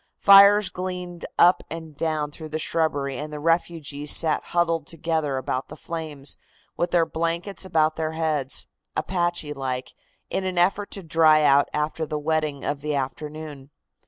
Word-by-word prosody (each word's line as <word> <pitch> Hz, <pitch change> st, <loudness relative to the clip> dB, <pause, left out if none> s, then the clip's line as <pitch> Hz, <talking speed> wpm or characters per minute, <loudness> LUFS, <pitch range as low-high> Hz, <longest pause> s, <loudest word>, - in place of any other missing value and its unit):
Fires 200 Hz, 0 st, +7 dB
gleamed 180 Hz, -1 st, -6 dB
up 175 Hz, +1 st, +6 dB
and 160 Hz, -2 st, -8 dB
down 155 Hz, -1 st, -1 dB
through 155 Hz, +1 st, -9 dB
the 155 Hz, -, -2 dB
shrubbery 145 Hz, -4 st, -1 dB
and 150 Hz, +1 st, -5 dB
the 150 Hz, -, -6 dB
refugees 155 Hz, -3 st, -1 dB
sat 155 Hz, 0 st, +3 dB
huddled 165 Hz, -3 st, 0 dB
together 160 Hz, -4 st, -2 dB
about 130 Hz, 0 st, -3 dB
the -, -, -10 dB
flames, 155 Hz, -4 st, -5 dB, 0.4 s
with 175 Hz, -, -1 dB
their 170 Hz, -2 st, +3 dB
blankets 170 Hz, +5 st, -2 dB
about 155 Hz, -3 st, +1 dB
their 160 Hz, 0 st, -2 dB
heads, 155 Hz, -4 st, -1 dB, 0.3 s
Apache 175 Hz, -4 st, -1 dB
like, 130 Hz, -2 st, -4 dB, 0.4 s
in 190 Hz, -, -1 dB
an 185 Hz, -1 st, -3 dB
effort 195 Hz, +3 st, +2 dB
to 195 Hz, -, -5 dB
dry 155 Hz, -2 st, +4 dB
out 140 Hz, -1 st, +4 dB
after 155 Hz, +1 st, -2 dB
the 150 Hz, -, -3 dB
wetting 155 Hz, -2 st, -1 dB
of 145 Hz, -1 st, -2 dB
the 150 Hz, 0 st, -2 dB
afternoon. 145 Hz, +1 st, -5 dB
160 Hz, 160 wpm, -24 LUFS, 150-170 Hz, 0.4 s, Fires